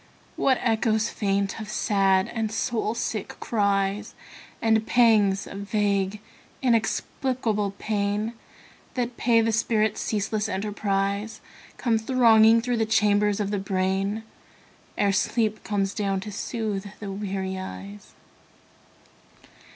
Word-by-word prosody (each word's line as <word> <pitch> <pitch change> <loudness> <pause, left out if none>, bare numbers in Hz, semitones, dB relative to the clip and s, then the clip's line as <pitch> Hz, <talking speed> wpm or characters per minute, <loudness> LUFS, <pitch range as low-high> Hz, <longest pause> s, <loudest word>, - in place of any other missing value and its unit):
What 260 -2 +2
echoes 220 -1 +1
faint 200 -1 -1
of 215 - -7
sad 195 -2 +2
and 225 -2 -2
soul 225 -1 -1
sick 220 -3 -3
cries, 200 -2 0 0.4
And 220 -1 +2
pangs 215 -5 +4
of 195 - -8
vague 200 -1 0 0.4
inexplicable 225 -2 0
pain 210 +1 -1 0.6
That 245 -1 -2
pay 230 -1 +3
the 225 0 +1
spirit's 215 -1 +1
ceaseless 215 0 -1
enterprise, 200 +1 -2 0.4
Come 230 -3 +1
thronging 225 -2 +5
through 245 0 -1
the 225 - +1
chambers 210 -1 +2
of 205 -1 -1
the 205 - 0
brain 195 +2 -1 0.7
Ere 200 -1 +2
sleep 215 +2 0
comes 200 -2 -1
down 195 -3 -1
to 210 +2 -7
soothe 210 -2 -3
the 200 -2 -5
weary 190 -1 -3
eyes. 100 - -9
210 Hz, 115 wpm, -25 LUFS, 195-225 Hz, 0.7 s, thronging